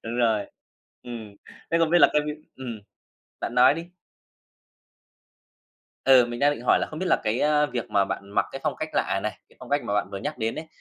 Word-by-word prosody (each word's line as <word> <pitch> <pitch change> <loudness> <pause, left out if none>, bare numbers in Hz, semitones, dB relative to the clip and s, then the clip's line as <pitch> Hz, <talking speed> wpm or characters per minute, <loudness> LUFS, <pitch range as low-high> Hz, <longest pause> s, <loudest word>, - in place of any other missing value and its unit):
Đúng 115 +1 -5
rồi. 110 -4 +1 0.5
Ừm, 115 -4 -8 0.4
thế 165 - +3
không 165 -1 +2
biết 175 - +5
là - - +7
cái 150 - +3
việc 150 - -2 0.2
ừm, 120 -5 -6 0.6
bạn 120 - -3
nói 125 +3 +6
đi. 170 +2 -8 2.1
Ừ, 130 -2 +7
mình 120 0 -6
đang 145 +1 +4
định 130 - -5
hỏi - - +5
là - - -2
không 155 - -7
biết 185 - -2
là - - +4
cái, 110 +3 0
ơ, 150 0 +3
việc 120 -4 -4
mà 100 -1 +3
bạn 100 - -5
mặc 100 - +1
cái 135 - -6
phong 150 -4 0
cách 155 - -4
lạ - - +2
này 95 +1 0
này, 105 - -4
cái - - -23
phong 125 - -11
cách 145 0 +1
mà 100 - -3
bạn 105 - +1
vừa 100 - -4
nhắc 95 - -4
đến 115 -1 -2
ấy, 160 - -6
125 Hz, 240 wpm, -25 LUFS, 110-150 Hz, 2.1 s, là